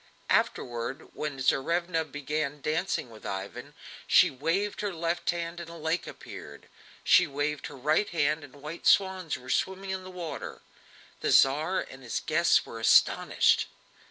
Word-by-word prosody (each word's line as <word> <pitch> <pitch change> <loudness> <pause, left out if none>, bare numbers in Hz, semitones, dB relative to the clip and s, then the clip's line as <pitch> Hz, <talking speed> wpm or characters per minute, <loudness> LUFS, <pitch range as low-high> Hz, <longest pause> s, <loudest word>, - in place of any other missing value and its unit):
Afterward, 120 +2 -1
when 150 -2 -4
Tsarevna 165 +6 +1
began 145 0 -3
dancing 155 -3 -1
with 110 - -14
Ivan, 115 +9 -6 0.3
she - - +6
waved 165 +10 -1
her 205 -1 -1
left 170 0 -2
hand 170 0 -2
and 170 -1 -8
a 170 - -9
lake 160 +2 -1
appeared; 75 0 -10 0.4
she - - +6
waved 145 +1 -2
her - - -11
right 155 +10 +1
hand 155 -2 0
and 145 -1 -13
white 155 +3 -5
swans 190 -4 +3
were 125 - -7
swimming 190 0 -1
in 190 0 -3
the 185 - -9
water. 175 -4 -7 0.6
The - - -1
Tsar 155 +7 +4
and 135 - -10
his 120 -3 -3
guests 170 +2 +3
were 115 - -8
astonished. 115 - +4
155 Hz, 155 wpm, -28 LUFS, 135-175 Hz, 0.6 s, she